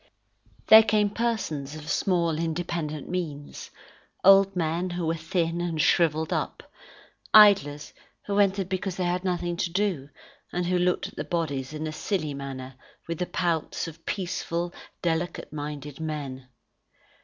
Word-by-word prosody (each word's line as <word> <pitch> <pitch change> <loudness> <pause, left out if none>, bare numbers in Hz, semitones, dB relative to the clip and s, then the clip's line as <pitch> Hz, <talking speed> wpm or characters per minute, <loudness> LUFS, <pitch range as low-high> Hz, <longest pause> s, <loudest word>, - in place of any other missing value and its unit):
There 220 0 +10
came 210 -1 +2
persons 180 -12 -2
of 155 -1 -9
small 170 -4 +1
independent 165 -3 -3
means, 155 -6 -5 0.6
old 195 0 +7
men 170 +1 -1
who 175 -1 -3
were 160 - +1
thin 165 +1 -1
and 170 -2 -2
shrivelled 160 0 +2
up, - - -3 0.7
idlers 185 -9 +6 0.3
who 200 0 0
entered 195 -2 +2
because 190 0 -3
they 185 - -1
had 180 +1 0
nothing 175 -2 -1
to 175 - -1
do, 180 -7 -1 0.4
and 180 0 -1
who 180 0 +1
looked 180 0 +1
at - - -20
the - - -2
bodies 145 -6 -2
in 155 0 -4
a 155 - -3
silly 155 -1 -2
manner 135 -2 -7 0.3
with 165 -1 -4
the 180 - -1
pouts 170 -3 -1
of 165 0 -11
peaceful, 175 -2 -2 0.3
delicate 170 -1 -2
minded 145 -1 -6
men. 140 -5 -5
170 Hz, 145 wpm, -26 LUFS, 155-180 Hz, 0.7 s, There